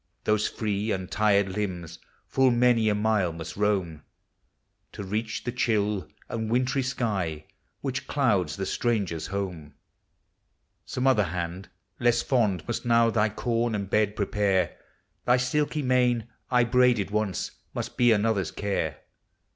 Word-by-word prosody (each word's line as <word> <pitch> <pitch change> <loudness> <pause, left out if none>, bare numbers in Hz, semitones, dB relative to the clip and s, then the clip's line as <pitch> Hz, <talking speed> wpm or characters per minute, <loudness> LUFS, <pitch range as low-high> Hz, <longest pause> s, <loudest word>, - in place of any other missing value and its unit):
those 105 0 +2
free, 105 -1 -2
untired 100 +1 +1
limbs 95 -4 -4 0.3
full 135 -1 +3
many 120 -2 +3
a 105 - +2
mile 105 -4 +1
must 80 -1 -7
roam, 95 -7 0 0.9
To - - -6
reach 110 +3 -3
the 120 - -2
chill 105 -6 0 0.2
and 110 -1 -3
wintry 125 +3 +1
sky 100 - -2 0.4
which 135 -1 -3
clouds 105 - +1
the 95 - -3
stranger's 100 -11 -1
home; 90 -6 -5 1.1
Some 130 - -2
other 110 -6 +4
hand, 85 +2 -4 0.3
less 120 0 +3
fond, 105 - +1
must 120 - -2
now 115 -1 +4
thy 110 -1 +2
coin 115 +1 -1
and 100 -2 -4
bed 105 -1 +2
prepare, 100 -3 +1 0.5
Thy 125 +1 +5
silky 145 +4 0
mane, 125 -3 +2 0.2
I 125 -1 +4
braided 120 -4 +3
once, 105 -3 -1 0.2
must - - -4
be 120 -1 +4
another's 105 -2 +2
care! 95 -8 -2
105 Hz, 135 wpm, -27 LUFS, 95-120 Hz, 1.1 s, Thy